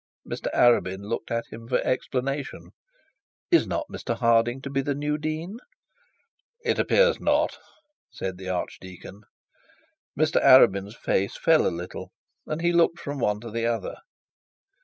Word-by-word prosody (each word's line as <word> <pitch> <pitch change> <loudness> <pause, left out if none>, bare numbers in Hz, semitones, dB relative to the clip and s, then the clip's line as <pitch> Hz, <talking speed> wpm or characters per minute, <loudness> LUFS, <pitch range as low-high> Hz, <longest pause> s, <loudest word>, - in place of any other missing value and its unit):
Mr - - -4
Arabin 100 -5 +3
looked 110 +2 -4
to 115 0 -2
him 115 +1 -10
for 125 - +2
explanation. 135 +2 -3 0.8
'Is 340 - +5
not 310 - -2
Mr 115 - -4
Harding 115 +1 +2
to 140 - -6
be 135 0 0
the 140 +1 -2
new 150 +1 -1
dean?' 155 +7 -4 1.0
'It - - 0
appears - - +3
not,' - - +1 0.5
said 95 -1 -6
the 95 -1 -6
archdeacon. 95 +2 -6 1.0
Mr - - +2
Arabin's 100 +2 +6
face 100 +1 -1
fell 160 -1 +4
a - - +3
little, 85 +1 -7 0.4
and 155 +1 -3
he 175 0 +2
looked 170 0 +3
from 145 0 -5
one 105 -3 0
to 115 -1 -8
the 115 +1 -1
other. 115 -1 -3
120 Hz, 145 wpm, -25 LUFS, 105-150 Hz, 1.0 s, Arabin's